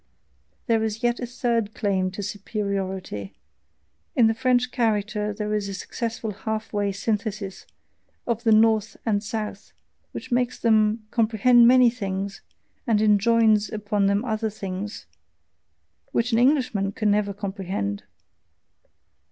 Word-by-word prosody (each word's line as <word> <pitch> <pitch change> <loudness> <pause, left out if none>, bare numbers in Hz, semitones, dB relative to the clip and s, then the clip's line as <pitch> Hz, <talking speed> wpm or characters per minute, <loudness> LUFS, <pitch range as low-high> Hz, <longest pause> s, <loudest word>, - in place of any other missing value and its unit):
There 225 -3 +2
is 220 +2 -3
yet 240 0 +1
a 245 - -4
THIRD 235 -3 -1
claim 190 -2 0
to 205 - -5
superiority: 190 - -4 0.8
in 240 - +5
the 225 - +4
French 250 +1 +1
character 210 -3 0
there 210 +1 -3
is 205 -1 -1
a 195 - -4
successful 225 +1 -4
half 220 +2 -4
way 205 -1 0
synthesis 205 -1 -3 0.6
of 235 -1 -2
the 225 - +3
North 220 0 +3
and 205 -2 +1
South, 210 -1 -5 0.4
which - - -8
makes 245 0 +1
them 215 -1 +2
comprehend 235 +1 +5
many 250 -1 +6
things, 200 -3 -4 0.5
and 220 -3 +3
enjoins 215 0 +4
upon 205 -2 0
them 200 +4 +1
other 220 -2 -1
things, 200 0 -6 1.1
which 235 +2 0
an 225 - +3
Englishman 245 -7 +2
can 215 0 +1
never 205 0 +1
comprehend. 190 - -4
215 Hz, 130 wpm, -24 LUFS, 200-230 Hz, 1.1 s, many